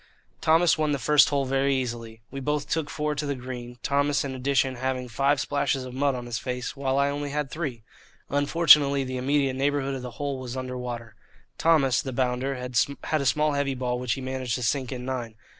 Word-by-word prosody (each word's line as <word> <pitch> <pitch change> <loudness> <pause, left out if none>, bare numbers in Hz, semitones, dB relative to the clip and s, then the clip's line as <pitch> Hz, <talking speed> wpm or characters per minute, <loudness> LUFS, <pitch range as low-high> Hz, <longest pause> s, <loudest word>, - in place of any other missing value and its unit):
Thomas 165 +1 +4
won 150 -1 +1
the - - +1
first 150 +3 +5
hole 140 -2 +1
very 135 +1 +1
easily. 115 -3 -4
We 135 - -5
both 150 +2 -1
took 160 -2 -1
four 150 0 -1
to 150 0 -3
the 140 - -1
green, 125 -1 -7
Thomas 140 +1 +1
in 135 - -4
addition 130 0 +1
having 130 0 -2
five 140 +4 +1
splashes 140 -2 0
of 125 - -8
mud 140 +1 +1
on 125 -1 -5
his 120 -2 -3
face 125 +2 -4
while 135 -1 -1
I 140 0 +3
only 145 0 -3
had 145 -1 -2
three. 135 -9 -4 0.4
Unfortunately 145 -1 +5
the 130 0 -4
immediate 135 +1 +1
neighbourhood 140 0 0
of 135 - -4
the 125 - -6
hole 140 -2 -2
was 130 0 -6
under 130 0 -4
water. 120 -3 -6 0.5
Thomas, 145 -6 +4
the 130 -3 -5
bounder, 130 +2 0
had 125 +4 -1
a - - -2
small 150 +3 +2
heavy 140 -1 0
ball 125 -1 -2
which 125 -2 0
he 135 - -5
managed 130 -2 -2
to 125 - -3
sink 130 +1 0
in 125 -1 -5
nine. 120 -4 -4
135 Hz, 210 wpm, -26 LUFS, 125-145 Hz, 0.5 s, first